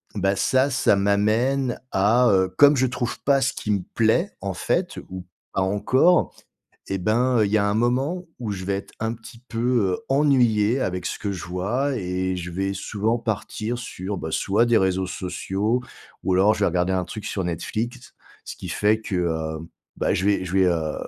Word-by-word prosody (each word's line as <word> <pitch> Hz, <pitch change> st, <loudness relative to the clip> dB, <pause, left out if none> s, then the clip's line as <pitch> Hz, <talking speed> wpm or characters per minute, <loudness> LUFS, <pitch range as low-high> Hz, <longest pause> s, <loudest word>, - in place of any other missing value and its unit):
bah, 95 Hz, 0 st, +1 dB
ça, 130 Hz, +6 st, +2 dB
ça 130 Hz, -6 st, +3 dB
m'amène 110 Hz, +6 st, +1 dB
à, 115 Hz, +6 st, +4 dB
heu, 95 Hz, -1 st, +3 dB
comme 145 Hz, 0 st, +7 dB
je 130 Hz, 0 st, +3 dB
trouve 120 Hz, -1 st, -3 dB
pas 140 Hz, -1 st, +3 dB
ce 135 Hz, +1 st, +2 dB
qui 110 Hz, -, -7 dB
me 100 Hz, -3 st, +1 dB
plaît 120 Hz, -, +2 dB
en 95 Hz, -1 st, -3 dB
fait, -, -, -1 dB
ou 95 Hz, -1 st, -7 dB, 0.3 s
pas 95 Hz, -, 0 dB
encore 130 Hz, -, +3 dB, 0.6 s
et 95 Hz, -, 0 dB
ben, 115 Hz, +5 st, +2 dB
heu, 105 Hz, -, +4 dB
il 100 Hz, -, -4 dB
y 110 Hz, -, +4 dB
a 100 Hz, -, +1 dB
un 100 Hz, -, 0 dB
moment 135 Hz, +10 st, 0 dB
où 115 Hz, -4 st, -4 dB
je 95 Hz, -2 st, -4 dB
vais 100 Hz, 0 st, -1 dB
être 100 Hz, -, -8 dB
un 110 Hz, +1 st, -1 dB
petit 115 Hz, 0 st, -12 dB
peu, 115 Hz, -, -4 dB, 0.4 s
heu, -, -, -13 dB
ennuyé 130 Hz, -5 st, +3 dB
avec 90 Hz, -3 st, -2 dB
ce -, -, -3 dB
que 100 Hz, -1 st, -3 dB
je 90 Hz, -, -6 dB
vois 110 Hz, +11 st, -1 dB
et 95 Hz, -1 st, -2 dB
je 90 Hz, 0 st, -5 dB
vais 95 Hz, +3 st, -2 dB
souvent 105 Hz, +4 st, -1 dB
partir 110 Hz, +1 st, -3 dB
sur, 100 Hz, -4 st, -5 dB
bah, 80 Hz, -3 st, -5 dB
soit 105 Hz, +8 st, +2 dB
des 120 Hz, -1 st, +4 dB
réseaux 95 Hz, 0 st, +1 dB
sociaux 95 Hz, +6 st, -2 dB, 0.4 s
ou 95 Hz, -, +1 dB
alors 95 Hz, +4 st, +4 dB
je -, -, -7 dB
vais -, -, +3 dB
regarder 90 Hz, +2 st, +1 dB
un 90 Hz, -1 st, 0 dB
truc 105 Hz, +4 st, -7 dB
sur 95 Hz, -, -2 dB
Netflix 110 Hz, +9 st, -4 dB, 0.3 s
ce -, -, -8 dB
qui -, -, -8 dB
fait 105 Hz, +1 st, +2 dB
que, 100 Hz, -, -5 dB
heu, 80 Hz, -2 st, -1 dB, 0.4 s
bah, -, -, +1 dB
je 95 Hz, -, -1 dB
vais 100 Hz, -2 st, +2 dB
je 90 Hz, -, -6 dB
vais, 95 Hz, -1 st, +4 dB
heu, 80 Hz, -3 st, 0 dB
105 Hz, 205 wpm, -23 LUFS, 95-120 Hz, 0.6 s, comme